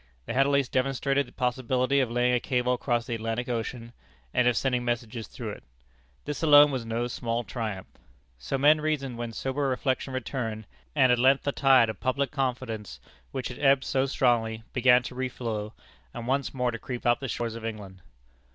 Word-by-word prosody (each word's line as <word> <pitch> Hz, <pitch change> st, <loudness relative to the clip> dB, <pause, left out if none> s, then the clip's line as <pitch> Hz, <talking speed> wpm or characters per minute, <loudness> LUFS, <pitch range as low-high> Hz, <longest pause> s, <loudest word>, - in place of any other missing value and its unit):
They -, -, -4 dB
had 135 Hz, +2 st, +3 dB
at -, -, +1 dB
least 140 Hz, -2 st, +1 dB
demonstrated 135 Hz, +1 st, +1 dB
the -, -, -15 dB
possibility 130 Hz, +2 st, 0 dB
of 130 Hz, -3 st, +1 dB
laying 120 Hz, +1 st, +2 dB
a 125 Hz, -, +3 dB
cable 125 Hz, 0 st, 0 dB
across 120 Hz, -1 st, -1 dB
the 120 Hz, -, -4 dB
Atlantic 115 Hz, +2 st, -3 dB
Ocean, 115 Hz, 0 st, -4 dB, 0.4 s
and 125 Hz, -, +3 dB
of 120 Hz, -2 st, +3 dB
sending 125 Hz, -2 st, 0 dB
messages 120 Hz, -2 st, -3 dB
through -, -, -6 dB
it. -, -, -10 dB, 0.6 s
This 145 Hz, -1 st, -4 dB
alone 145 Hz, -2 st, +7 dB
was 130 Hz, -3 st, -2 dB
no 115 Hz, +1 st, -1 dB
small 120 Hz, -1 st, -2 dB
triumph. 105 Hz, -3 st, -4 dB, 0.5 s
So 65 Hz, -, -2 dB
men 150 Hz, +3 st, +5 dB
reasoned 140 Hz, -6 st, -2 dB
when 120 Hz, -1 st, -4 dB
sober 135 Hz, +4 st, -2 dB
reflection 130 Hz, +1 st, -1 dB
returned, 115 Hz, -4 st, -4 dB, 0.3 s
and 130 Hz, -4 st, +5 dB
at 125 Hz, -, +3 dB
length 135 Hz, +2 st, +4 dB
the 140 Hz, -, 0 dB
tide 135 Hz, -4 st, +5 dB
of 110 Hz, -, -5 dB
public 135 Hz, +2 st, 0 dB
confidence, 125 Hz, -6 st, -3 dB, 0.3 s
which 130 Hz, -, -4 dB
had 125 Hz, -, -8 dB
ebbed 135 Hz, -2 st, +4 dB
so 135 Hz, 0 st, 0 dB
strongly, 115 Hz, -4 st, +1 dB
began 125 Hz, -1 st, +5 dB
to 125 Hz, -, -7 dB
reflow, 115 Hz, -4 st, -4 dB, 0.4 s
and 120 Hz, -1 st, -5 dB
once 135 Hz, +2 st, 0 dB
more 125 Hz, -2 st, -1 dB
to 115 Hz, -, -6 dB
creep 125 Hz, +2 st, -6 dB
up 120 Hz, 0 st, +3 dB
the 135 Hz, -, -4 dB
shores 115 Hz, -2 st, -3 dB
of 115 Hz, 0 st, -8 dB
England. 100 Hz, -4 st, -7 dB
125 Hz, 195 wpm, -27 LUFS, 115-135 Hz, 0.6 s, alone